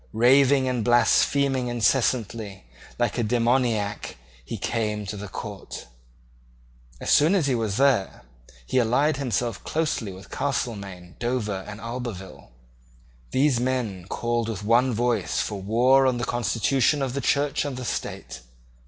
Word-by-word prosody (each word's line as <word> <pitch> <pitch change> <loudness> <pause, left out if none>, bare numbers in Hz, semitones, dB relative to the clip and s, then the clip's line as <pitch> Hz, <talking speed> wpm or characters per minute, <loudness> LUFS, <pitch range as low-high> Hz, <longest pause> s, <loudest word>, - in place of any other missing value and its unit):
Raving 130 +3 +4
and 125 -3 -1
blaspheming 130 +2 +3
incessantly, 115 -4 0 0.3
like 120 -1 0
a - - +1
demoniac, 115 - 0 0.3
he - - -6
came 105 -2 -2
to 100 - -5
the 105 0 -7
court. - - -8 1.1
As - - -2
soon 160 +7 +5
as 175 -7 +2
he 135 - +1
was 110 -4 -1
there, 130 -8 +2 0.4
he 130 - +1
allied 135 +6 +2
himself 120 -5 -2
closely 150 -10 -2
with 95 +1 -13
Castelmaine, 100 -10 -4
Dover, 110 -5 -2
and 105 0 -8
Albeville. 115 -4 -7 0.8
These 135 -2 +2
men 120 -8 -2
called 120 +1 -1
with 105 -3 -5
one 120 +4 +3
voice 120 +1 0
for 100 -2 -3
war 125 +6 +4
on 125 -2 +1
the 120 - -2
constitution 125 +3 +1
of 130 -2 -2
the 140 - -2
Church 140 +2 +1
and 140 -3 -4
the 125 - -5
State. 65 - -5
120 Hz, 140 wpm, -25 LUFS, 105-130 Hz, 1.1 s, soon